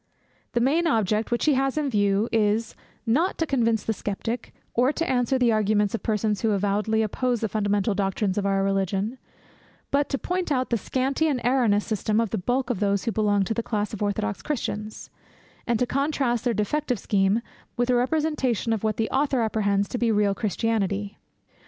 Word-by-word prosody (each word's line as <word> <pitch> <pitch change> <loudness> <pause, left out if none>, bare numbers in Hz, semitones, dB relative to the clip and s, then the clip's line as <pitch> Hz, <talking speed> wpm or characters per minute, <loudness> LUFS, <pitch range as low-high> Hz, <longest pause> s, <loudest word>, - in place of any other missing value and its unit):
The 240 - +2
main 305 +8 +2
object 220 - +1
which 240 -1 0
he 305 - +4
has 270 +1 0
in 300 -2 +1
view 205 -2 +2
is, 220 0 +1 0.3
not 300 +11 +1
to 325 - 0
convince 230 -7 +1
the 225 - -1
Sceptic, 220 +4 -4 0.2
or 250 +3 +3
to 330 +2 -2
answer 250 -1 +1
the 245 -2 +3
arguments 210 -1 +2
of 230 - -2
persons 210 -2 0
who 220 -2 +2
avowedly 210 +3 +1
oppose 240 +2 -1
the 220 - +1
fundamental 205 0 0
doctrines 195 0 -1
of 205 - -1
our 195 0 +1
Religion; 195 +4 -1 0.7
but 285 0 +1
to 275 - 0
point 360 +2 -2
out 255 -2 0
the - - +3
scanty 270 +8 0
and 280 -5 0
erroneous 235 -5 +2
system 215 0 0
of 230 -3 0
the - - -1
bulk 245 +5 0
of 230 - -2
those 200 -1 +1
who 230 - -1
belong 205 -2 +2
to 210 - -2
the 230 - -1
class 210 -1 -2
of 215 - -6
orthodox 200 - -1
Christians, 215 -7 -4 0.6
and 235 -2 +2
to 250 - +1
contrast 270 -3 0
their 240 -2 +1
defective 250 +5 0
scheme 200 +3 +1 0.3
with 245 +1 +1
a - - +3
representation 260 -4 0
of 220 - -3
what 215 -1 0
the 225 - 0
author 270 -2 +1
apprehends 205 -2 +1
to 245 - -3
be 235 -1 +2
real 205 -2 +2
Christianity. 205 -1 -1
225 Hz, 195 wpm, -25 LUFS, 205-255 Hz, 0.7 s, he